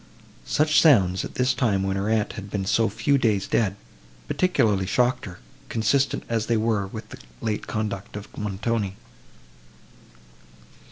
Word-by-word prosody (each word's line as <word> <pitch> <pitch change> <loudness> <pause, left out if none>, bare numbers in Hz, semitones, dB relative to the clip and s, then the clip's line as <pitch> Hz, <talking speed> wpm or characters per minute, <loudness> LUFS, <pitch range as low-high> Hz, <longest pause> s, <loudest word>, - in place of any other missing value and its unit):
Such 155 +1 +3
sounds, 95 - +4
at - - -8
this 125 +1 +2
time, 110 -6 +1
when 95 0 -1
her 100 +2 -1
aunt 110 -2 +1
had 100 0 -8
been 100 -1 -2
so 115 +3 +2
few 115 +7 +1
days 105 -5 +1
dead, 100 -4 +1 0.5
particularly 105 - +1
shocked 125 +5 +1
her, 90 -4 -9 0.3
consistent 125 +5 +1
as 115 -2 -1
they 115 - +2
were 110 -3 0
with 110 +3 -8
the - - -10 0.2
late 105 -2 -3
conduct 105 -3 -4
of 105 -1 -9
Montoni. 105 0 -2
110 Hz, 150 wpm, -24 LUFS, 100-115 Hz, 0.5 s, sounds